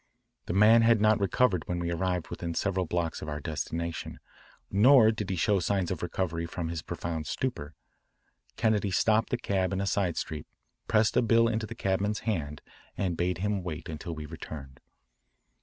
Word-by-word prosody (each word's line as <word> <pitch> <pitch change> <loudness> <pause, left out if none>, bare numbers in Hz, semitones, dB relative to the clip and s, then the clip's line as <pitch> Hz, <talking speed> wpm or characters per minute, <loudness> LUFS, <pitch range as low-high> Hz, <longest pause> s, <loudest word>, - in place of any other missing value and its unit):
The - - -2
man 110 +4 +6
had 115 -1 +5
not 110 0 +4
recovered 100 -1 +1
when 90 - -2
we 85 0 -2
arrived 90 0 -1
within 85 -1 -5
several 95 -3 0
blocks 85 -1 -2
of 75 - -5
our 75 0 -3
destination, 80 +3 -4 0.5
nor 110 +2 +6
did 105 -3 -4
he 95 - -1
show 100 +3 +2
signs 95 0 0
of 90 - -3
recovery 85 -1 -2
from 85 -1 -4
his 85 -1 -4
profound 80 0 -4
stupor. 80 - -3 0.8
Kennedy 110 -3 +1
stopped 110 +4 +2
the 125 - 0
cab 95 -4 -1
in 95 - -1
a 100 - -1
side 95 -3 0
street, 75 -2 -4 0.4
pressed 110 0 +3
a - - +5
bill 115 0 +4
into 110 -1 -1
the - - -8
cabman's 100 +2 -1
hand, 75 -9 -3 0.3
and 90 -4 -1
bade 90 +1 0
him 100 +1 -1
wait 85 -1 -6
until 80 +1 -5
we 75 -1 -6
returned. 70 -3 -9
95 Hz, 180 wpm, -29 LUFS, 85-105 Hz, 0.8 s, man